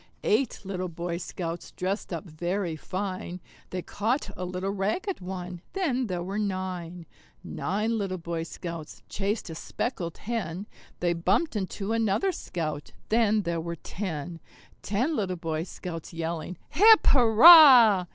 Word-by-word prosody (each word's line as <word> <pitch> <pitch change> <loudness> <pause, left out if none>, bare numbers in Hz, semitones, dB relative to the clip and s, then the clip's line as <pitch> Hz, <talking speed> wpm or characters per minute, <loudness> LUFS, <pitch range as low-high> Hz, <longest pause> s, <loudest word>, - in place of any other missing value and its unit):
Eight 275 - +1
little 185 -1 -4
Boy 170 +1 -4
Scouts 170 -1 -5
dressed 190 +3 -3
up - - -4
very 175 +2 -3
fine; 185 +1 -5 0.3
They 180 -1 -4
caught 230 +7 -2
a 180 - -5
little 180 +2 -3
ragged 215 - -2
one 180 -1 -6
then 265 -10 0
there 180 -3 -3
were 195 +4 -3
nine. 185 -4 -4 0.4
Nine 215 +4 -2
little 190 -2 -2
Boy 170 -1 -4
Scouts 165 -1 -7
chased 200 -2 -2
a - - -5
speckled 170 - -4
hen; 200 -5 -4 0.4
They 175 -1 +2
bumped 195 - 0
into 195 +1 -3
another 225 - +1
Scout 155 - -5 0.2
then 220 -2 +3
there 170 -1 -2
were 170 +1 -4
ten. 170 -2 -5 0.4
Ten 250 +11 -1
little 190 -6 -1
Boy 165 -1 -3
Scouts 170 -3 -7
yelling 165 +1 -4
"Hip, 430 +8 +6
hurrah!" 245 - +8
185 Hz, 140 wpm, -27 LUFS, 170-220 Hz, 0.4 s, hurrah